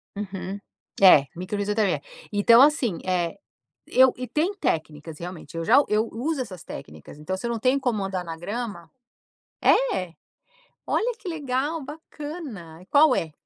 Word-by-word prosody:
Uhum, 195 -1 -5 0.4
é, 165 -7 +8
micro 185 +4 -4
fisioterapia. 205 0 0 0.3
Então 230 +4 +6
assim, 270 - +3
eh, 175 -3 0 0.5
eu 260 0 +5
e 255 -1 -5
tem 340 +7 0
técnicas 155 - -3
realmente, 170 -2 -8
eu 165 - -2
já 275 +5 +6
eu 215 +2 +2
uso 270 +4 -2
essas 185 -9 -7
técnicas, 75 - -10
então 185 +5 -3
se 235 - -4
eu - - -1
não 230 - -2
tenho 260 +4 +2
como 235 -7 -1
andar 190 -2 -3
na 165 -1 -7
grama 200 -2 -5 0.7
é? 185 - +2 0.7
Olha 485 +2 +1
que 375 - -8
legal, 295 0 -2
bacana, 290 - -9
qual 290 -2 +6
é? 160 -3 -2
210 Hz, 150 wpm, -25 LUFS, 175-270 Hz, 0.7 s, é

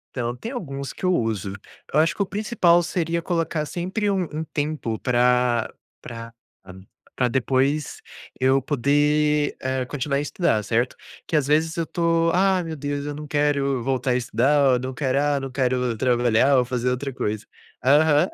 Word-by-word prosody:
Então. 120 -1 -2
Tem 230 - -7
alguns 140 - -5
que - - -14
eu 185 0 +3
uso. 110 - -1 0.4
Eu 150 - +4
acho 165 +1 +2
que - - -3
o 200 - +2
principal 190 -4 +2
seria 170 0 -1
colocar 165 -3 -1
sempre 185 +6 -2
um 190 -2 +1
um 155 +1 -3
tempo 145 -7 -3
pra 125 -1 +2 0.3
pra 115 -1 -9 0.8
pra 125 -1 +2
depois, 135 +4 0 0.4
eu 130 +1 +3
poder, 145 +2 +1
eh, 130 -1 -1
continuar 140 +1 -2
a - - +1
estudar, 150 - 0
certo. 120 +2 0 0.3
Que 160 - 0
às 145 -3 0
vezes 160 +3 +1
eu 165 - 0
tô 165 0 +1
"Ah, 190 +1 +3
meu 165 -1 -5
Deus, 145 0 -4
eu 145 0 -4
não 150 +1 -7
quero 140 -3 +1
voltar 130 0 0
a - - +2
estudar. 130 +3 +2
Ou 125 - +2
não 130 +1 -5
quero, 130 -1 -1
ah, 145 -1 +1
não 135 0 -5
quero 125 -2 0
ir - - -9
trabalhar 120 +2 +3
ou 125 - +3
fazer 125 0 -1
outra 130 +2 -3
coisa" 105 -4 -3 0.4
Aham. 150 +4 +4
140 Hz, 180 wpm, -23 LUFS, 125-160 Hz, 0.8 s, Eu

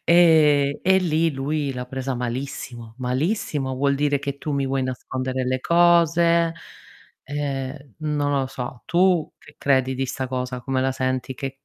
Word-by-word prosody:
e 155 -5 +5
e 190 +1 +4
lì 165 -2 +1
lui 140 +1 -2
l'ha 125 -1 -5
presa 130 0 -3
malissimo. 120 -2 -5
Malissimo, 135 - -1
vuol 140 +1 +2
dire 145 0 +1
che 140 0 -5
tu 150 - -5
mi 140 -1 0
vuoi 135 0 0
nascondere 130 0 -3
le 130 0 0
cose, 170 0 +4 0.7
ehm, 140 -2 -4
non 150 -2 -1
lo 135 - -1
so. 125 -1 -7
Tu 175 -2 +2
che - - -17
credi 130 -1 +2
di 130 0 -2
sta 130 +1 -3
cosa? 125 -1 -3
Come 135 0 -1
la 135 +1 +1
senti? 130 0 -2
Che 135 +1 -4
135 Hz, 160 wpm, -23 LUFS, 130-155 Hz, 0.7 s, e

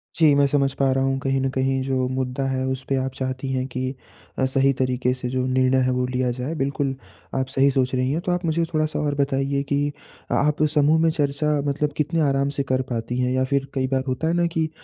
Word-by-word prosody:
जी, 160 -3 +5
मैं 140 0 +4
समझ 140 -1 +1
पा 135 -1 +1
रहा 135 0 +1
हूँ 135 0 +1
कहीं 135 0 0
न 135 - +1
कहीं 130 0 0
जो 130 -1 0
मुद्दा 130 +1 -2
है 130 0 -1
उस 130 0 -3
पे 135 - +2
आप 135 - -3
चाहती 130 0 -3
हैं 130 0 -1
कि 130 0 -3 0.5
अ, 130 - +3
सही 135 +1 +3
तरीक़े 125 -1 0
से 125 -1 -4
जो 130 0 -1
निर्णय 130 0 +2
है 130 - +2
वो 125 0 0
लिया 125 -1 0
जाए 130 +6 -4
बिल्कुल, 135 -1 -1 0.4
आप 130 -1 0
सही 135 +1 +3
सोच 130 -1 0
रही 130 +1 +1
हैं। 155 - 0
तो 180 - +1
आप 175 +1 -1
मुझे 165 +1 +1
थोड़ा-सा 155 0 0
और 145 -1 0
बताइए 140 0 0
कि 145 +1 +1 0.4
अ - - +2
आप 150 0 +1
समूह 150 +1 +4
में 165 - +4
चर्चा 145 -1 -1 0.2
मतलब 145 +1 -1
कितने 160 +2 0
आराम 135 0 +1
से 140 - +1
कर 130 0 +2
पाती 115 +1 -2
हैं 125 0 +1
या 130 0 +1
फिर 140 0 0
कई 130 -1 0
बार 130 0 0
होता 130 +5 -1
है 165 - +1
ना 175 0 +2
कि 160 -1 +1
135 Hz, 245 wpm, -23 LUFS, 130-145 Hz, 0.5 s, जी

